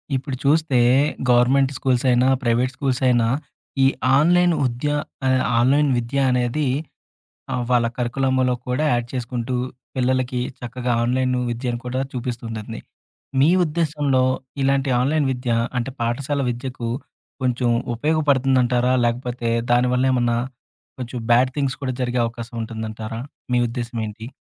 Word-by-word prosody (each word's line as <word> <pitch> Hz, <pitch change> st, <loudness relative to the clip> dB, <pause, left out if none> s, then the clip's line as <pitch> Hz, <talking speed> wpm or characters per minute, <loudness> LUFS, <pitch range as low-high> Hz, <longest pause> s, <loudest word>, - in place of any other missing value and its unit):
ఇప్పుడు 130 Hz, +1 st, -3 dB
చూస్తే 145 Hz, -2 st, +3 dB, 0.5 s
government 130 Hz, +3 st, +4 dB
schools 130 Hz, -1 st, 0 dB
అయినా 125 Hz, +1 st, +4 dB, 0.2 s
ప్రైవేట్ 125 Hz, +2 st, +1 dB
స్కూల్స్ 130 Hz, -2 st, -1 dB
అయినా 120 Hz, -2 st, +3 dB, 0.6 s
ఈ -, -, +7 dB, 0.3 s
ఆన్‌లైన్ 175 Hz, +3 st, +4 dB
ఉద్య 125 Hz, +4 st, -1 dB, 0.4 s
అదే 130 Hz, -1 st, +3 dB, 0.2 s
ఆన్‌లైన్ 140 Hz, +4 st, +3 dB
విద్యనేది 125 Hz, +2 st, 0 dB, 0.9 s
ఆహ్, 125 Hz, -, -1 dB
వాళ్ళ 120 Hz, -1 st, +3 dB
కరిక్యులమ్‌లో 130 Hz, +1 st, +1 dB
కూడా 125 Hz, +5 st, 0 dB
యాడ్ 120 Hz, -1 st, 0 dB
చేసుకుంటూ 125 Hz, 0 st, -3 dB, 0.4 s
పిల్లలకి 130 Hz, 0 st, 0 dB, 0.2 s
చక్కగా 125 Hz, +1 st, -3 dB
ఆన్‌లైను 125 Hz, +1 st, +1 dB
విద్యను 120 Hz, 0 st, -3 dB
కూడా 125 Hz, +1 st, -2 dB
చూపిస్తుంటుంది. 115 Hz, -3 st, -5 dB, 0.6 s
మీ 140 Hz, -, +5 dB, 0.2 s
ఉద్దేశ్యంలో 150 Hz, -5 st, 0 dB, 0.4 s
ఇలాంటి 135 Hz, 0 st, +1 dB
ఆన్‌లైన్ 145 Hz, +2 st, +1 dB
విద్య 125 Hz, -1 st, -4 dB, 0.3 s
అంటే 125 Hz, +2 st, -2 dB
పాఠశాల 130 Hz, +5 st, -1 dB
విద్యకు 120 Hz, -1 st, -5 dB, 0.5 s
కొంచెం 125 Hz, -1 st, +1 dB, 0.2 s
ఉపయోగపడుతుందంటారా? 130 Hz, -3 st, +2 dB
లేకపోతే 120 Hz, 0 st, -2 dB, 0.2 s
దానివల్లేమన్నా 125 Hz, -1 st, +2 dB, 0.6 s
కొంచెం 125 Hz, 0 st, -5 dB
బ్యాడ్ 125 Hz, +2 st, +5 dB
థింగ్స్ 140 Hz, -2 st, -1 dB
కూడా 130 Hz, -1 st, -1 dB
జరిగే 125 Hz, 0 st, 0 dB
అవకాశం 115 Hz, 0 st, -8 dB
ఉంటుందంటారా? 110 Hz, 0 st, -5 dB, 0.3 s
మీ 125 Hz, -, +3 dB
ఉద్దేశ్యమేంటి? 115 Hz, -2 st, -5 dB
125 Hz, 115 wpm, -22 LUFS, 120-135 Hz, 0.9 s, ఈ